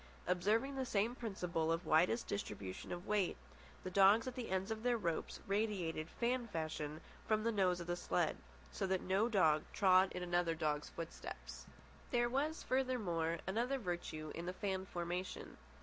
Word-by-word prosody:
Observing 215 +10 +1
the 265 - 0
same 220 -1 +1
principle 180 -9 -1
of 165 +2 -1
widest 175 +9 +3
distribution 100 - -5
of 175 0 -5
weight, 205 -3 +1 0.5
the 185 - -4
dogs 200 +4 +6
at 255 - -3
the 250 -2 -5
ends 190 +3 -1
of 220 0 -3
their 245 0 +2
ropes 170 -6 -2
radiated 195 -6 -1
fan 240 0 0
fashion 155 -4 -3 0.3
from 215 -1 +2
the 230 - +2
nose 185 -4 +2
of 170 - -5
the 175 0 -1
sled, 175 - 0 0.4
so 195 - -2
that 190 -1 +1
no 195 +5 +2
dog 160 -8 +4
trod 190 -1 +5
in 180 - -3
another's 165 -4 0
footsteps. 165 0 -7 0.4
There 240 -1 +2
was, 300 +5 0
furthermore, 200 -11 0
another 235 +8 0
virtue 175 - -4
in 170 +1 -5
the 180 - -2
fan 190 -1 -2
formation. 175 +1 -4
190 Hz, 165 wpm, -38 LUFS, 170-225 Hz, 0.5 s, dogs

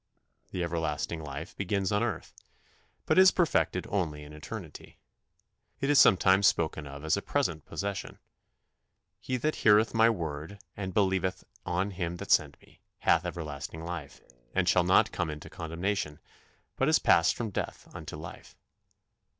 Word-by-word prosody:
The 90 - -3
everlasting 80 -1 -2
life 75 +4 -7
begins 100 0 -1
on 105 +1 +2
earth, 115 -8 -3 0.7
but - - +4
is 190 0 +9
perfected 175 -3 +1
only 80 -7 -1
in 75 +1 -12
eternity. 80 +1 -9 0.8
It 140 +1 +1
is 145 - +6
sometimes 95 +1 +6
spoken 80 -2 0
of 70 +2 -9
as 80 +4 +2
a - - -2
present 85 - -1
possession: 100 -1 -4 1.0
"He 130 +3 -2
that 155 +5 -1
heareth 110 +1 +4
my 115 0 +5
word, 80 -2 -4 0.2
and 95 -2 -4
believeth 95 -2 0 0.2
on 95 +3 0
him 90 -2 -3
that - - -6
sent - - +3
me, - - -23 0.2
hath 85 +2 +3
everlasting 80 -2 -6
life, 85 -5 -7 0.3
and - - +2
shall - - +4
not - - +4
come 85 -2 -2
into 75 0 -8
condemnation; 85 -1 -3 0.6
but - - +2
is - - +5
passed 85 +1 +4
from 115 -3 -4
death - - -5
unto - - -7
life." 80 0 -10
90 Hz, 150 wpm, -29 LUFS, 80-100 Hz, 1.0 s, is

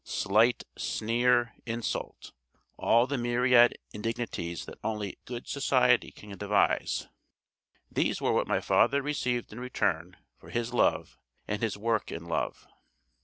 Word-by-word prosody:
Slight, 110 +5 +2 0.2
sneer, 120 +1 +1
insult, 115 0 -4 0.4
all 120 +1 +3
the 140 0 -2
myriad 120 0 +4 0.2
indignities 105 -6 -4
that - - -11
only 105 -3 -3
'good 120 -1 -7
society' 125 -3 +3
can 105 -1 -11
devise, 105 0 +1 0.8
these - - 0
were - - +1
what - - +1
my - - +1
father 140 0 +3
received 125 -6 -2
in 115 - -8
return 90 -8 -1 0.2
for - - -15
his 120 +1 -2
love 120 - +1 0.3
and 105 0 -2
his 110 -3 -1
work 115 +1 -1
in 85 0 -6
love. 85 - -3
115 Hz, 130 wpm, -29 LUFS, 105-125 Hz, 0.8 s, myriad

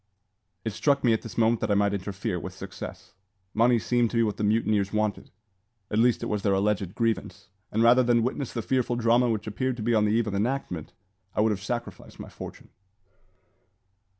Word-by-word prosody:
It 110 - -2
struck 140 +6 +1
me 120 -3 +4
at 110 - 0
this 115 - -10
moment 115 0 +3
that - - -1
I 100 - +3
might 100 0 +2
interfere, 100 0 -3
with 95 +2 -7
success. 95 0 -9 0.4
Money 120 +2 +4
seemed 115 +4 +1
to 120 - -2
be 115 - +4
what 105 -2 -1
the - - -2
mutineers 105 -2 +1
wanted; 110 -1 -1 0.6
at 105 - +1
least 120 +1 +3
it - - -1
was 105 -1 -1
their 100 -1 +2
alleged 100 -2 0
grievance; 115 -5 -2 0.2
and 110 +2 +2
rather 120 +2 +6
than 120 -2 +3
witness 130 +1 -2
the 115 - -4
fearful 125 -1 0
drama 120 +1 +3
which 110 -2 -1
appeared 125 +4 -2
to 110 - -4
be 120 +2 +1
on 105 -1 +3
the 105 - +2
eve 115 +1 +2
of 105 - -3
enactment, 100 - -2 0.4
I - - +2
would 110 0 +3
have 100 -2 -3
sacrificed 120 +3 -6
my - - -8
fortune. - - -10
110 Hz, 205 wpm, -27 LUFS, 100-120 Hz, 0.6 s, rather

